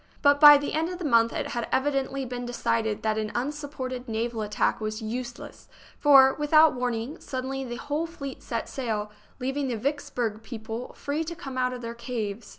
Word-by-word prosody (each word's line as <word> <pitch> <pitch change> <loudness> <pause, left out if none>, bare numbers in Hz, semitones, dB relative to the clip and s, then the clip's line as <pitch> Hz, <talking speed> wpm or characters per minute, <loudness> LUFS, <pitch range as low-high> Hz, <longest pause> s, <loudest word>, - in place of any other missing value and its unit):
But 285 -1 +5
by 295 -1 +11
the 285 - -3
end 320 +2 0
of 360 - -5
the 355 - -5
month 230 -4 +4
it - - -3
had 235 -1 -3
evidently 270 0 0
been 245 0 -5
decided 230 -3 -1
that 220 0 +1
an 215 -1 -3
unsupported 260 -2 -4
naval 225 0 -2
attack 210 +1 0
was 215 0 -3
useless, 240 +2 -6 0.3
for, 270 -2 +7
with 295 +1 -4
out 310 0 +8
warning, 245 +2 -3
suddenly 265 +1 -4
the 240 -2 -5
whole 295 +6 -2
fleet 280 -5 -8
set 230 -2 -3
sail, 215 -5 -3 0.3
leav 265 +1 -2
ing 285 -2 0
the 240 -3 -2
Vicksburg 245 -4 -2
people 225 +1 -6
free 290 +3 -2
to 340 +2 -6
come 270 -4 -8
out 255 0 +1
of 250 -1 -7
their 230 0 -4
caves. 235 -3 -5
255 Hz, 195 wpm, -27 LUFS, 230-285 Hz, 0.3 s, by